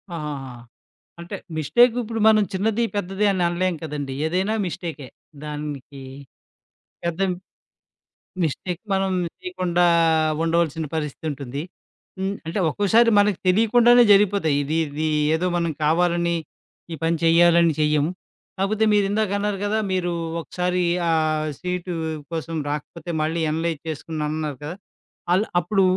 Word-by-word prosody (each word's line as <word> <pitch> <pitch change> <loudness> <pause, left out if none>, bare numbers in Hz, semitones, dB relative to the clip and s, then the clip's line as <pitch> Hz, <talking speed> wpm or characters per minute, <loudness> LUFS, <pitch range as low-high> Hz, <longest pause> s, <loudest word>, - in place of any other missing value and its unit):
ఆహాహా! 145 -5 -5 0.7
అంటే, 175 +4 -6 0.2
మిస్టేక్ 225 - +4
ఇప్పుడు 225 0 -4
మనం 215 -1 +6
చిన్నది, 215 +4 0
పెద్దది 195 +1 -1
అని 185 -2 -1
అనలేం 175 +1 0
కదండీ! 145 -3 -4
ఏదైనా 190 +6 0
మిస్టేకే. 160 -6 -6 0.4
దానికి 145 -2 -6 1.0
పెద్ద 170 0 -2 1.2
మిస్టేక్ 175 +4 -3
మనం 195 0 +1 0.3
చేయకుండా 180 - 0 0.6
ఉండవలసిన 165 -1 0
పరిస్థితుంటుంది. 145 -3 -4 0.6
హ్మ్. 195 +1 -1
అంటే, 170 +5 -2
ఒక్కోసారి 220 +7 +3
మనకు 205 -2 +3
తెలియకుండానే 235 +5 +5
జరిగిపోతాయి. 195 -7 +3
ఇది, 155 +3 -1
ఇది 155 +2 -2 0.3
ఏదో 175 +3 0
మనం 170 -1 0
కావాలని, 170 +2 +2 0.6
ఈ - - -3
పని 165 +1 +1
చెయ్యాలని 170 0 +5
చెయ్యము. 150 +1 +2 0.5
కాపోతే, 215 +3 +1
మీరు 205 -1 +3
ఇందాక 210 -1 0
అన్నారు 205 -1 -1
కదా! 215 +2 0
మీరు 175 -1 0 0.3
ఒకసారి 180 +1 -1 0.3
ఆహ్, 155 -1 +1
సీటు 180 0 -3 0.4
కోసం 165 0 -3
రాకపోతే, 150 +3 -5
మళ్ళీ 165 +2 -1
ఎనలైజ్ 160 -1 -2
చేసుకున్నా 155 0 -4
అన్నారు 155 -3 -3
కదా! 155 +4 -5 0.6
ఆళ్ళు 195 +4 +3
అప్పుడు 195 +3 +1
170 Hz, 120 wpm, -23 LUFS, 155-195 Hz, 1.2 s, మనం